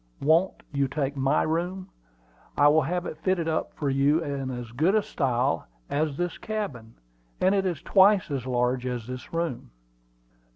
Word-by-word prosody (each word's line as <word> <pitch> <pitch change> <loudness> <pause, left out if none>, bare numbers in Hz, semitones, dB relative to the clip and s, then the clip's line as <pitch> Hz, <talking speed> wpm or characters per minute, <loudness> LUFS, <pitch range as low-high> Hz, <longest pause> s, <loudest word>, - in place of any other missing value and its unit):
Won't 165 +6 +2
you 140 -1 +1
take 140 0 -2
my 135 +2 +2
room? 180 +4 -2 0.7
I 145 - +6
will 155 +2 +4
have 175 +5 -2
it 155 - -6
fitted 180 -2 0
up 160 -1 -1
for 145 - -3
you 145 +4 +2
in 140 -3 -3
as 120 -2 -6
good 165 - +3
style 135 - 0 0.2
as 145 -1 0
this 175 -1 -2
cabin; 145 - -5 0.4
and 190 +1 +3
it 195 -1 +1
is 170 -5 -3
twice 195 -3 +4
as 130 -3 -3
large 125 0 0
as 125 -3 -3
this 125 +1 -8
room." 165 -6 -3
145 Hz, 165 wpm, -26 LUFS, 130-175 Hz, 0.7 s, I